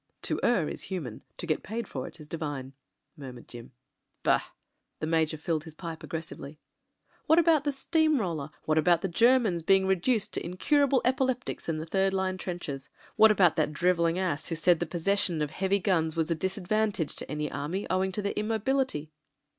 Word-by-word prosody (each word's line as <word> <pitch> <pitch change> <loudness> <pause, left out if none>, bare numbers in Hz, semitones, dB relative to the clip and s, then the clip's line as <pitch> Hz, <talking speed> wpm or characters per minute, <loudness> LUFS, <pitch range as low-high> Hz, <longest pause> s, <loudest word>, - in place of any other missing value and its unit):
"To - - 0
err 205 -10 +2
is - - -5
human; 155 - -5 0.2
to - - -4
get 155 -2 0
paid 225 0 -5
for 130 -2 -5
it - - -12
is 150 - -11
divine," 145 -4 -5 0.4
mur 135 -5 -8
mured 120 - -13
Jim. 120 -1 -11 0.5
"Bah!" - - +3 0.6
the - - -2
Major 160 -1 +1
filled 155 0 -2
his 160 -2 -10
pipe 165 -1 -7
aggressively. 160 -2 -7 0.7
"What 320 - +5
about 325 -3 +4
the 290 - +2
steam 310 +1 +2
roller, 165 -8 -3 0.2
what 155 0 +3
about 170 +1 +3
the - - -1
Ger 235 +9 +5
mans 195 -9 -1
being 190 +3 +4
reduced 190 +4 +1
to - - -2
incurable 275 - +2
epileptics 255 -4 -1
in 160 - 0
the 155 - -4
third 195 +3 +1
line 190 -1 -1
trenches 145 -8 -5
— - - -26
^what 220 - +9
about 190 -6 +4
that 155 -1 +1
drivelling 170 0 +2
ass 180 -5 -1
who 165 - -1
said 165 +1 +3
the 175 - -2
possession 175 0 0
of 150 -1 -1
heavy 195 +3 +1
guns 170 -5 +1
was 165 0 0
a - - +5
disadvantage 190 0 -1
to - - -6
an 150 -1 -2
army 150 +8 -3
owing 190 +1 +1
to 205 +2 -3
their 200 - -1
immobility 220 - -1
175 Hz, 195 wpm, -28 LUFS, 155-210 Hz, 0.7 s, ^what